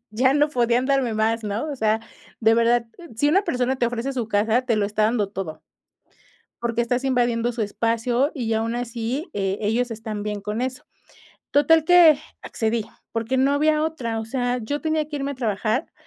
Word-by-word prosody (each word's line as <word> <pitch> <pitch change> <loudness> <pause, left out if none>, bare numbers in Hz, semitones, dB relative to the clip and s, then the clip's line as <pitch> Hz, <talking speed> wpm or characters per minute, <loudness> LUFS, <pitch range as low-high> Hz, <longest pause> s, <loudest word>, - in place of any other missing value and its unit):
ya 260 +5 +2
no 295 +1 +3
podían 245 -2 +1
darme 270 -4 +1
más, 220 +1 0
¿no?, 210 +8 -2
o 285 - -5
sea, 220 -2 +1 0.4
de 225 0 +4
verdad, 235 0 +3 0.3
si 290 +7 +2
una 380 +6 +4
persona 250 -2 0
te 245 - +1
ofrece 245 +3 -3
su 245 -4 -2
casa, 220 +4 +2
te 240 -3 0
lo 210 - +1
está 210 +1 0
dando 215 -2 +1
todo, 190 -6 -6 1.0
porque 235 0 -1
estás 245 +2 -1
invadiendo 240 -2 +1
su 235 -1 -4
espacio, 230 +6 0
y 230 -5 -1
aún 225 +1 -1
así, 245 - -3
eh, 195 -1 -1
ellos 230 +4 0
están 215 -1 -5
bien 210 -1 -4
con 210 +3 -3
eso, 255 0 -3 0.7
total 305 +2 +4
que 340 -4 +7 0.2
accedí, 225 -1 -2 0.3
porque 230 +3 -1
no 270 +2 +3
había 305 +1 +2
otra, 245 -8 -3
o - - -5
sea, 245 +1 -1
yo 290 +7 -3
tenía 315 -1 0
que 300 - -5
irme 280 0 -2
a - - -7
trabajar 225 - -1
240 Hz, 190 wpm, -23 LUFS, 220-270 Hz, 1.0 s, que